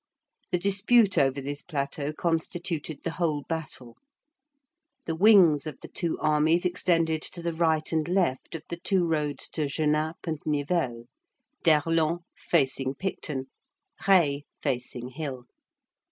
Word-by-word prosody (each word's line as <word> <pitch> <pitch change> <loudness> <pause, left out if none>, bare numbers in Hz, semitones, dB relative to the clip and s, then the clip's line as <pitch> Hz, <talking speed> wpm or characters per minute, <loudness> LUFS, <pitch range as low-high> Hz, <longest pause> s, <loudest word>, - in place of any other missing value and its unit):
The 180 - +2
dispute 200 +3 +3
over 135 0 +2
this 145 +1 -4
plateau 140 -2 -3
constituted 165 -1 -3
the 165 - -2
whole 160 -4 -1
battle. 135 -7 -6 1.1
The - - -2
wings 170 -6 +6
of 150 - -7
the - - -8
two 170 -3 -2
armies 155 +3 +2
extended 165 -3 +1
to 170 +1 -6
the 170 0 -1
right 160 -1 +1
and 160 -1 0
left 175 -7 0
of 160 - -6
the 170 - -4
two 180 0 +1
roads 150 -4 -1
to 155 -3 -2
Genappe 155 +2 -1
and 160 -3 -2
Nivelles; 145 -5 -1 0.6
d'Erlon 165 +1 +2
facing 135 -4 0
Picton, 150 -6 -3 0.6
Reille 165 -8 +5 0.2
facing 125 -2 -3
Hill. 130 -3 -6
160 Hz, 130 wpm, -27 LUFS, 145-170 Hz, 1.1 s, wings